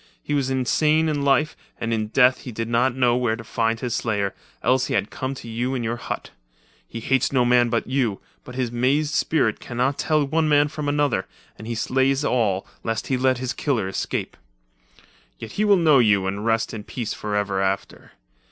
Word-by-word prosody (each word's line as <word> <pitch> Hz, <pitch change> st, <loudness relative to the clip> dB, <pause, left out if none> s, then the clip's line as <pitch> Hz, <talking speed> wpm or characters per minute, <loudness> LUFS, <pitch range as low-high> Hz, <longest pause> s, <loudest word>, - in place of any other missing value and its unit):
He -, -, -3 dB
was 140 Hz, -2 st, +1 dB
insane 150 Hz, +5 st, +2 dB
in 150 Hz, -2 st, -1 dB
life, 140 Hz, +2 st, +2 dB, 0.2 s
and 115 Hz, 0 st, -1 dB
in 110 Hz, -1 st, -1 dB
death 125 Hz, +3 st, +4 dB
he 125 Hz, -, -8 dB
did 115 Hz, 0 st, -4 dB
not 120 Hz, +2 st, +1 dB
know 125 Hz, -2 st, +3 dB
where 120 Hz, -3 st, +1 dB
to 115 Hz, -, -9 dB
find 115 Hz, 0 st, -1 dB
his 120 Hz, -1 st, -3 dB
slayer; 105 Hz, -4 st, -1 dB, 0.3 s
else 130 Hz, +1 st, +2 dB
he -, -, -1 dB
had 100 Hz, +1 st, -1 dB
come 130 Hz, +1 st, -4 dB
to 125 Hz, -, -10 dB
you 120 Hz, +3 st, -2 dB
in 125 Hz, -, -2 dB
your 115 Hz, +1 st, -2 dB
hut. -, -, -6 dB, 0.6 s
He 115 Hz, -, -7 dB
hates 135 Hz, +2 st, +1 dB
no 125 Hz, -3 st, +3 dB
man 120 Hz, 0 st, +4 dB
but 115 Hz, 0 st, 0 dB
you, 125 Hz, -6 st, 0 dB, 0.2 s
but 125 Hz, -, -10 dB
his 125 Hz, -2 st, -1 dB
mazed 140 Hz, +5 st, +1 dB
spirit 150 Hz, -10 st, +1 dB
can 120 Hz, -, -8 dB
not 130 Hz, +3 st, +1 dB
tell 155 Hz, -2 st, +2 dB
one 155 Hz, +2 st, +1 dB
man 145 Hz, 0 st, +4 dB
from 150 Hz, -1 st, -3 dB
another, 145 Hz, 0 st, +1 dB, 0.3 s
and 110 Hz, -, -10 dB
he 120 Hz, -, -3 dB
slays 135 Hz, +4 st, +1 dB
all, 105 Hz, -8 st, +1 dB, 0.2 s
lest 115 Hz, -1 st, -3 dB
he 135 Hz, -, +2 dB
let 130 Hz, 0 st, +2 dB
his 130 Hz, 0 st, -3 dB
killer 120 Hz, -10 st, -1 dB
escape. 95 Hz, -, -3 dB, 1.0 s
Yet 110 Hz, -, -8 dB
he 210 Hz, -, 0 dB
will 205 Hz, -2 st, +5 dB
know 155 Hz, -6 st, +5 dB
you 105 Hz, -5 st, +3 dB
and 100 Hz, +2 st, -3 dB
rest 115 Hz, 0 st, +1 dB
in 110 Hz, -2 st, -6 dB
peace, 115 Hz, +1 st, -4 dB
forever 105 Hz, -2 st, -1 dB
after. 95 Hz, 0 st, -3 dB
125 Hz, 205 wpm, -23 LUFS, 115-135 Hz, 1.0 s, will